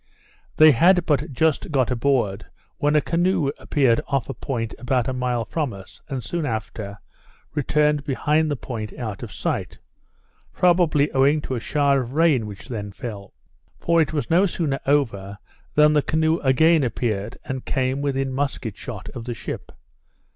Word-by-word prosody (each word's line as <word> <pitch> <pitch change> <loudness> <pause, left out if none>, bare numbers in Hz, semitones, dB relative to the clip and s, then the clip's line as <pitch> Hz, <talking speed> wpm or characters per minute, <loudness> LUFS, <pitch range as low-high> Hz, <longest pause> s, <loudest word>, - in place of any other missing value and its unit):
They 155 0 +8
had 175 +6 +4
but 145 -1 0
just 155 +3 +1
got 130 -5 +1
aboard, 120 -5 0 0.3
when 150 +1 +2
a 150 - +5
canoe 170 -4 +1
appeared 130 -6 +2
off 140 -1 -1
a - - -2
point 115 -5 -4
about 125 -1 0
a 130 - -1
mile 125 -2 -1
from 145 +2 -2
us, 95 -1 -13
and 130 -4 -4
soon 170 -2 -3
after, 110 -4 -4 0.6
returned 150 0 +1
behind 150 +2 +1
the 145 - 0
point 115 -5 -6
out 110 -5 -5
of - - -7
sight, - - -3 0.8
probably 170 -5 +3
owing 140 +3 +3
to 135 - -5
a 125 - -1
shower 140 +2 +2
of 125 +1 -7
rain 150 -8 +3
which 100 -2 -10
then 105 -6 -5
fell; 100 -2 -8 0.5
for 170 0 +3
it 155 - 0
was 150 -2 -2
no 180 +4 +4
sooner 155 -6 -2
over, 105 -9 0 0.4
than 150 0 +6
the 150 - +4
canoe 160 +3 +1
again 155 +4 +4
appeared, 110 -3 -2
and 130 -1 -5
came 130 +1 -1
within 135 -2 -1
musket 135 -6 -2
shot 110 -5 -8
of 120 -3 -8
the 120 -1 -4
ship. - - -7
135 Hz, 170 wpm, -23 LUFS, 120-150 Hz, 0.8 s, They